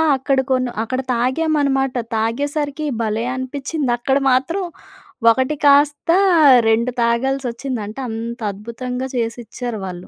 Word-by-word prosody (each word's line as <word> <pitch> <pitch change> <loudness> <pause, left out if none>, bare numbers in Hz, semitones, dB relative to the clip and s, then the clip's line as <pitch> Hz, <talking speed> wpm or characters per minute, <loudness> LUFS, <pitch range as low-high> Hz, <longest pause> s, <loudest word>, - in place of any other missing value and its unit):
అక్కడ 265 0 0
కొని 255 -1 +1
అక్కడ 255 +3 -2
తాగామన్నమాట. 270 +1 +1 0.2
తాగేసరికి 285 +6 -2 0.2
భలే 220 0 -1
అనిపించింది. 270 +1 -3
అక్కడ 265 +3 +1
మాత్రం 330 +10 +1 0.7
ఒకటి 260 +5 0
కాస్త, 285 +2 +4 0.6
రెండు 235 +3 +2
తాగాల్సి 255 +3 0
ఒచ్చింది 240 -1 -4
అంటే 220 +6 -7
అంత 230 +2 -5
అద్భుతంగా 250 +5 -5
చేసిచ్చారు 235 -1 -4
వాళ్ళు. 180 -1 -8
255 Hz, 115 wpm, -19 LUFS, 235-275 Hz, 0.7 s, కాస్త